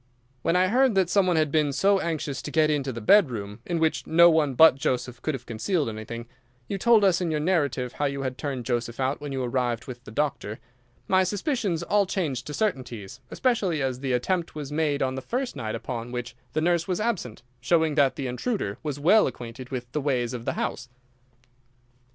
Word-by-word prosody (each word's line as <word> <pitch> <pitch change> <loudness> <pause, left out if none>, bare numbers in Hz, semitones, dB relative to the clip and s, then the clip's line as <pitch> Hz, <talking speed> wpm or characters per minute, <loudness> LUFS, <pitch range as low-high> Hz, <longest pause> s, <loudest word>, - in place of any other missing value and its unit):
When 165 +5 +1
I 185 +1 +3
heard 255 0 +3
that 185 -3 +2
some 200 -2 +3
one 180 - +2
had 155 -2 +2
been 150 -2 +2
so 195 +7 +3
anxious 155 -5 -3
to - - -6
get 155 0 +3
into 140 -3 -1
the 115 - -6
bedroom, 110 - +3
in 175 - -1
which 160 -1 0
no 170 +1 +7
one 150 -4 +2
but 160 +2 +8
Joseph 125 -2 -2
could 155 - -1
have 125 -1 -9
concealed 140 - -1
anything—you 120 - -8
told 230 0 +5
us 185 -2 +3
in 175 - 0
your 155 -1 0
narrative 145 -7 0
how 145 - -1
you 140 -1 -2
had 130 -1 -3
turned 135 -4 -4
Joseph 120 -1 -2
out 135 +2 -1
when 145 -1 -5
you 135 -1 -2
arrived 120 -2 -1
with 125 -1 -9
the - - -11
doctor—my 125 - -2
suspicions 200 - -1
all 200 +2 +2
changed 145 -10 -2
to 150 - -5
certainties, 125 - -3
especially 205 - 0
as 130 -2 -2
the 130 -1 -1
attempt 170 +8 -1
was 145 -2 -6
made 150 -2 0
on 130 0 0
the 130 - -4
first 250 - -3
night 110 -5 -4
upon 120 0 -5
which 120 -1 -5 0.2
the 155 - 0
nurse 170 0 +1
was 180 -2 -1
absent, 200 - -2 0.2
showing 160 -3 +2
that 140 -3 +3
the 140 - -4
intruder 125 - -2
was 145 -2 -4
well 195 +9 +5
acquainted 125 +1 -8
with 125 -2 -5
the 150 - -2
ways 125 -4 0
of 120 -1 -6
the - - -1
house." 125 0 -3
140 Hz, 205 wpm, -26 LUFS, 125-170 Hz, 0.2 s, but